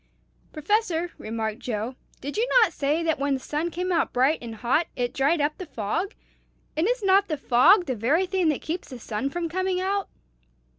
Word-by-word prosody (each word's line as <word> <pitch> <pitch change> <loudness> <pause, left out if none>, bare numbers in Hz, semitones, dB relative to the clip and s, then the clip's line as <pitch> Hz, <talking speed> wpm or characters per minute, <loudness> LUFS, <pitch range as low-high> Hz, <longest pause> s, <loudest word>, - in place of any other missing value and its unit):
"Professor," 350 0 0
remarked 220 0 -3
Joe, 225 +1 -3 0.3
"did 285 +2 -5
you 460 +3 +1 0.2
not 365 -6 0
say 300 +4 0
that 320 -3 0
when 280 0 +1
the - - -4
sun 300 +5 -2
came 360 +3 -3
out 335 -2 +1
bright 265 +6 +2
and 230 -2 -7
hot, 250 +9 +1
it 245 -1 -2
dried 285 +5 +2
up 295 +1 +1
the 370 - -6
fog? 275 - -3 0.6
and 320 +5 +1
is - - 0
not 390 +1 +4
the 310 - -2
fog 315 - +5
the 260 - -2
very 280 - +2
thing 370 -3 +1
that 300 - -1
keeps 335 +3 -4
the 255 - -7
sun 230 +3 -3
from 340 +3 -3
coming 370 +2 -1
out?" 390 +1 -1
315 Hz, 200 wpm, -25 LUFS, 260-365 Hz, 0.6 s, fog